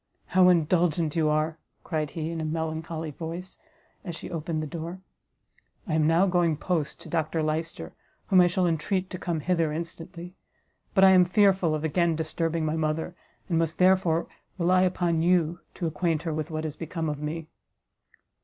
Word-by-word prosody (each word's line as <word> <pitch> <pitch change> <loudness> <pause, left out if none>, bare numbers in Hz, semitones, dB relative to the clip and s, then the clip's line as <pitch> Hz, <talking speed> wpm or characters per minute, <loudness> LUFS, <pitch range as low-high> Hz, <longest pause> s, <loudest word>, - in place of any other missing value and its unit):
"How 185 -1 +6
indulgent 170 -2 +2
you 160 -2 +2
are," 155 +1 0 0.2
cried 155 -4 -2
he, 160 +1 -4
in 165 -1 -3
a - - -3
melancholy 160 0 -3
voice, 170 +4 -7 0.4
as 175 -4 -5
she - - -8
opened 160 -1 -2
the - - -3
door; 170 +3 -6 0.9
"I 160 - -3
am 155 -1 +3
now 165 +4 +4
going 175 -4 +2
post 160 -2 -2
to - - -10
Dr 160 -1 -1
Lyster, 155 - -3 0.3
whom 185 -1 +5
I 175 - +5
shall 180 +1 +1
entreat 180 +3 -1
to 180 - -5
come 170 -4 -2
hither 165 -1 +1
instantly; 170 +2 -6 0.6
but 190 - +5
I 190 - +9
am 185 -1 +7
fearful 185 -3 +3
of 155 - -4
again 165 +1 +1
disturbing 165 +1 -1
my 155 +1 0
mother, 160 +2 -2 0.3
and 165 -2 +1
must 165 -1 -1
therefore 180 -3 +3 0.3
rely 180 +1 +3
upon 175 -3 +1
you 175 -1 +2 0.2
to 175 - -3
acquaint 160 0 0
her 165 -2 -2
what 155 +1 -3
is 155 -1 -4
become 165 +1 -4
of 150 -1 -3
me." 155 +2 -4
165 Hz, 175 wpm, -27 LUFS, 155-175 Hz, 0.9 s, I